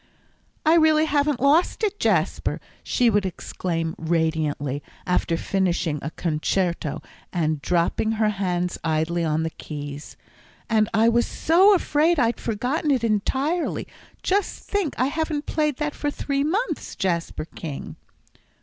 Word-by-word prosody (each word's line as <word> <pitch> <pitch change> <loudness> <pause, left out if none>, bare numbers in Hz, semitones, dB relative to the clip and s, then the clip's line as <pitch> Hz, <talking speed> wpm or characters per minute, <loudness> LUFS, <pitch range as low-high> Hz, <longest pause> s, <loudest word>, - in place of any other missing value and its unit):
"I 315 - +6
really 315 -1 +5
haven't 290 -3 +1
lost 300 - +3
it, 415 -1 0
Jasper!" - - +1 0.2
she 245 - +1
would 205 -1 +2
exclaim 165 -3 -3
radiantly, 155 -4 0 0.2
after 180 -2 +1
finishing 175 -5 0
a 150 - -3
concerto, 170 0 -1 0.3
and 155 -4 0
dropping 180 +7 +1
her 215 -1 +2
hands 180 -3 -1
idly 160 +2 0
on 155 0 +1
the 160 - -2
keys. 145 -1 -8 0.5
"And 215 -1 +2
I 225 +1 +4
was 235 +1 +3
so 375 +5 +5
afraid 325 0 +2
I'd 235 -3 +1
forgotten 250 +8 -1
it 260 -5 +2
entirely. 265 - 0 0.4
Just 400 +1 0
think, 400 -8 -1
I 255 - +4
haven't 305 +1 -2
played 300 -4 0
that 300 -1 -2
for 290 - -2
three 280 -1 -1
months, 395 +12 -2
Jasper 170 -5 -1
King." 155 -3 -7
215 Hz, 135 wpm, -24 LUFS, -, 0.5 s, I